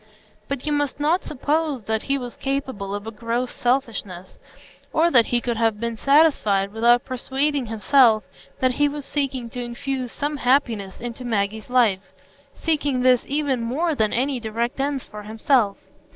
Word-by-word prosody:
But 280 Hz, -1 st, -4 dB
you 300 Hz, -, -1 dB
must 290 Hz, -1 st, -1 dB
not 320 Hz, +6 st, +2 dB
suppose 295 Hz, -2 st, -1 dB
that 220 Hz, +1 st, -1 dB
he 275 Hz, 0 st, 0 dB
was 245 Hz, -2 st, -6 dB
capable 260 Hz, -8 st, -3 dB
of 205 Hz, +1 st, -6 dB
a 225 Hz, -, -5 dB
gross 235 Hz, +3 st, -2 dB
selfishness, 220 Hz, -8 st, -2 dB, 0.5 s
or 330 Hz, +2 st, +3 dB
that 240 Hz, -5 st, +5 dB
he 240 Hz, -, +1 dB
could 235 Hz, -1 st, -2 dB
have 225 Hz, -2 st, +1 dB
been 235 Hz, 0 st, -2 dB
satisfied 220 Hz, -8 st, +3 dB
without 235 Hz, +2 st, +4 dB
persuading 270 Hz, +1 st, -1 dB
himself 225 Hz, 0 st, +4 dB, 0.4 s
that 255 Hz, -1 st, +3 dB
he 290 Hz, +3 st, +2 dB
was 290 Hz, -1 st, -6 dB
seeking 270 Hz, -4 st, -2 dB
to 245 Hz, -, -5 dB
infuse 250 Hz, +1 st, -4 dB
some 290 Hz, +1 st, -3 dB
happiness 240 Hz, -8 st, +1 dB
into 240 Hz, +1 st, -6 dB
Maggie's 215 Hz, -2 st, -2 dB
life,—seeking 250 Hz, +5 st, -1 dB
this 250 Hz, -1 st, +4 dB
even 280 Hz, -3 st, 0 dB
more 295 Hz, +9 st, 0 dB
than 220 Hz, -7 st, +1 dB
any 260 Hz, +2 st, 0 dB
direct 230 Hz, +3 st, -3 dB
ends 275 Hz, -1 st, -1 dB
for 210 Hz, 0 st, -9 dB
himself. 220 Hz, 0 st, +1 dB
250 Hz, 160 wpm, -23 LUFS, 225-280 Hz, 0.5 s, that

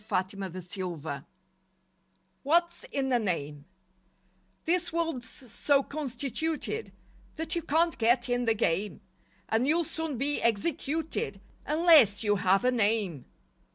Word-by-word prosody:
LIFE 185 Hz, +1 st, 0 dB
WAVES 185 Hz, -1 st, -6 dB
11 160 Hz, -6 st, -5 dB, 1.2 s
WHAT'S 340 Hz, -, +1 dB
IN 270 Hz, -, -1 dB
A 245 Hz, -, +4 dB
NAME 150 Hz, -8 st, -3 dB, 1.0 s
This 350 Hz, +1 st, +1 dB
world's 325 Hz, -8 st, -2 dB
so 275 Hz, +4 st, 0 dB
constituted 300 Hz, -, -3 dB, 0.4 s
That 320 Hz, +1 st, -3 dB
you 340 Hz, -, 0 dB
can't 330 Hz, +2 st, +1 dB
get 240 Hz, +2 st, +3 dB
in 245 Hz, 0 st, 0 dB
the 225 Hz, -1 st, +2 dB
game, 200 Hz, -1 st, -1 dB, 0.5 s
And 230 Hz, +4 st, +1 dB
you'll 335 Hz, +3 st, +3 dB
soon 320 Hz, -3 st, -4 dB
be 285 Hz, +4 st, 0 dB
executed 275 Hz, +1 st, -1 dB, 0.3 s
Unless 300 Hz, -, +5 dB
you 205 Hz, -1 st, +2 dB
have 195 Hz, +3 st, +2 dB
a 250 Hz, -, +4 dB
"name." 205 Hz, -, 0 dB
245 Hz, 120 wpm, -29 LUFS, 200-315 Hz, 1.2 s, Unless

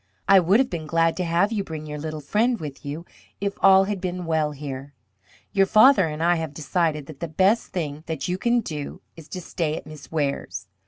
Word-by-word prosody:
I 195 Hz, 0 st, +8 dB
would 185 Hz, +6 st, +4 dB
have 265 Hz, -, +1 dB
been 160 Hz, -3 st, -4 dB
glad 165 Hz, 0 st, +2 dB
to 185 Hz, -, 0 dB
have 175 Hz, +5 st, +2 dB
you 210 Hz, -3 st, -1 dB
bring 160 Hz, -4 st, -7 dB
your 150 Hz, 0 st, -6 dB
little 155 Hz, 0 st, -5 dB
friend 225 Hz, -, +1 dB
with 150 Hz, -3 st, -7 dB
you 150 Hz, +4 st, -6 dB, 0.3 s
if 200 Hz, 0 st, -1 dB
all 190 Hz, 0 st, +7 dB
had 195 Hz, -1 st, -3 dB
been 180 Hz, -1 st, -3 dB
well 160 Hz, -2 st, +1 dB
here. 140 Hz, -1 st, -7 dB, 0.6 s
Your 195 Hz, -1 st, +4 dB
father 215 Hz, -3 st, +6 dB
and 155 Hz, +1 st, -4 dB
I 175 Hz, 0 st, +3 dB
have 160 Hz, -3 st, -5 dB
decided 155 Hz, 0 st, -1 dB
that 140 Hz, -1 st, -11 dB
the 170 Hz, -, -3 dB
best 190 Hz, +8 st, +2 dB
thing 150 Hz, -4 st, -4 dB
that 160 Hz, -4 st, -3 dB
you 180 Hz, +1 st, -2 dB
can 240 Hz, +2 st, +2 dB
do 150 Hz, -8 st, -6 dB
is 160 Hz, -2 st, -12 dB
to 185 Hz, -, -6 dB
stay 165 Hz, -2 st, -2 dB
at -, -, -8 dB
Miss 155 Hz, -1 st, -12 dB
Ware's. 140 Hz, -9 st, -2 dB
165 Hz, 220 wpm, -24 LUFS, 150-190 Hz, 0.6 s, I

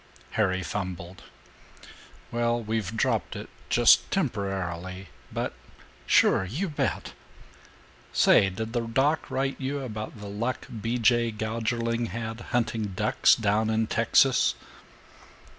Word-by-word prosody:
Harry 95 Hz, -3 st, +1 dB
fumbled, 90 Hz, -1 st, -5 dB, 1.1 s
"Well, 120 Hz, 0 st, +1 dB
we've 110 Hz, -2 st, -3 dB
dropped -, -, 0 dB
it -, -, -7 dB, 0.2 s
just -, -, +5 dB
temporarily, 95 Hz, -2 st, -3 dB, 0.2 s
but -, -, -3 dB, 0.5 s
sure -, -, +4 dB
you 145 Hz, -, -3 dB
bet! 150 Hz, -, -2 dB, 1.0 s
Say, 95 Hz, -, +5 dB
did 110 Hz, +4 st, -5 dB
the 120 Hz, -, +1 dB
doc 135 Hz, +7 st, +1 dB
write 135 Hz, +1 st, -2 dB
you 140 Hz, +2 st, -2 dB
about 110 Hz, -4 st, -6 dB
the 105 Hz, -, -8 dB
luck 115 Hz, +6 st, -3 dB, 0.2 s
B. 115 Hz, +3 st, -1 dB
J. 120 Hz, 0 st, +3 dB
Gougerling 115 Hz, +2 st, -2 dB
had 115 Hz, 0 st, -5 dB
hunting 110 Hz, -4 st, -1 dB
ducks -, -, +4 dB
down 110 Hz, +1 st, +1 dB
in 110 Hz, 0 st, +1 dB
Texas?" 115 Hz, +4 st, +3 dB
110 Hz, 115 wpm, -27 LUFS, 100-120 Hz, 1.1 s, just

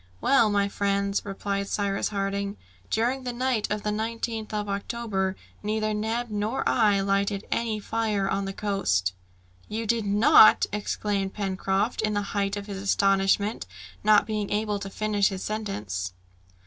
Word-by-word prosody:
"Well, 235 Hz, -, +4 dB
my 200 Hz, -1 st, +2 dB
friends," 200 Hz, 0 st, 0 dB
replied 200 Hz, 0 st, -3 dB
Cyrus 200 Hz, -1 st, 0 dB
Harding, 200 Hz, 0 st, -2 dB, 0.3 s
"during 245 Hz, +4 st, +1 dB
the 250 Hz, -, -2 dB
night 245 Hz, -2 st, 0 dB
of 210 Hz, 0 st, -2 dB
the 210 Hz, -, 0 dB
19th 225 Hz, 0 st, -3 dB
of 210 Hz, -1 st, -2 dB
October, 200 Hz, -2 st, -2 dB, 0.3 s
neither 215 Hz, 0 st, -1 dB
Neb 225 Hz, +2 st, -2 dB
nor 210 Hz, +5 st, -1 dB
I 210 Hz, -4 st, +3 dB
lighted 200 Hz, +1 st, 0 dB
any 225 Hz, -2 st, 0 dB
fire 210 Hz, -2 st, -1 dB
on 195 Hz, 0 st, -1 dB
the 195 Hz, -, -3 dB
coast." 95 Hz, -, 0 dB, 0.5 s
"You 225 Hz, +1 st, -3 dB
did 225 Hz, -1 st, 0 dB
not!" 210 Hz, +1 st, +7 dB
exclaimed 205 Hz, -1 st, -2 dB
Pencroft, 195 Hz, +2 st, -1 dB
in 215 Hz, -1 st, 0 dB
the 205 Hz, -, 0 dB
height 200 Hz, 0 st, 0 dB
of 200 Hz, -, -5 dB
his 200 Hz, -2 st, -6 dB
astonishment, 195 Hz, +1 st, +2 dB, 0.4 s
not 210 Hz, 0 st, +5 dB
being 215 Hz, -2 st, -2 dB
able 210 Hz, 0 st, -1 dB
to 195 Hz, 0 st, -6 dB
finish 205 Hz, 0 st, +1 dB
his 190 Hz, -2 st, -5 dB
sentence. 105 Hz, -, -3 dB
205 Hz, 150 wpm, -26 LUFS, 195-215 Hz, 0.5 s, not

